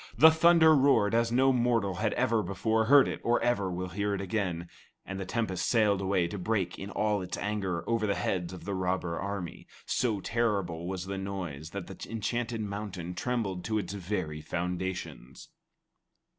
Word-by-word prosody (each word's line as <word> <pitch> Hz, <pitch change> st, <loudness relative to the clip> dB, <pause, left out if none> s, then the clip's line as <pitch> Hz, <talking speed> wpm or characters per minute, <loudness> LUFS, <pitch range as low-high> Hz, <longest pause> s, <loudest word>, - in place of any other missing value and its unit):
The 160 Hz, +1 st, +9 dB
thunder 160 Hz, -1 st, +6 dB
roared 130 Hz, -7 st, +4 dB
as 115 Hz, 0 st, +2 dB
no 130 Hz, +2 st, +4 dB
mortal 115 Hz, -6 st, +1 dB
had 110 Hz, +2 st, 0 dB
ever 115 Hz, -3 st, +2 dB
before 110 Hz, +4 st, 0 dB
heard 140 Hz, +2 st, +7 dB
it -, -, -4 dB
or 120 Hz, +1 st, +3 dB
ever 115 Hz, -6 st, +1 dB
will 90 Hz, +1 st, -3 dB
hear 100 Hz, +2 st, -1 dB
it -, -, -4 dB
again, 90 Hz, -4 st, -2 dB, 0.4 s
and 95 Hz, 0 st, -5 dB
the 95 Hz, -, -5 dB
tempest 100 Hz, -6 st, -1 dB
sailed 105 Hz, -4 st, +3 dB
away 95 Hz, -2 st, +1 dB
to 100 Hz, -, -5 dB
break 95 Hz, -2 st, -1 dB
in 95 Hz, -, -6 dB
all 105 Hz, -1 st, 0 dB
its 90 Hz, 0 st, -5 dB
anger 95 Hz, -5 st, -2 dB
over 115 Hz, -2 st, +1 dB
the 100 Hz, -, +1 dB
heads 90 Hz, -2 st, -1 dB
of 90 Hz, -, -9 dB
the 100 Hz, -, -2 dB
robber 90 Hz, -2 st, -1 dB
army. 100 Hz, -4 st, -5 dB, 0.2 s
So 110 Hz, -5 st, 0 dB
terrible 100 Hz, -6 st, -1 dB
was 95 Hz, -1 st, -4 dB
the 95 Hz, 0 st, -4 dB
noise 90 Hz, -7 st, -5 dB
that 100 Hz, 0 st, -6 dB
the -, -, -10 dB
enchanted 115 Hz, +1 st, -2 dB
mountain 100 Hz, -4 st, -5 dB
trembled 105 Hz, -6 st, -2 dB
to 110 Hz, -1 st, 0 dB
its 95 Hz, -2 st, -3 dB
very 90 Hz, -6 st, -3 dB
foundations. 90 Hz, -5 st, -4 dB
100 Hz, 180 wpm, -29 LUFS, 90-115 Hz, 0.4 s, The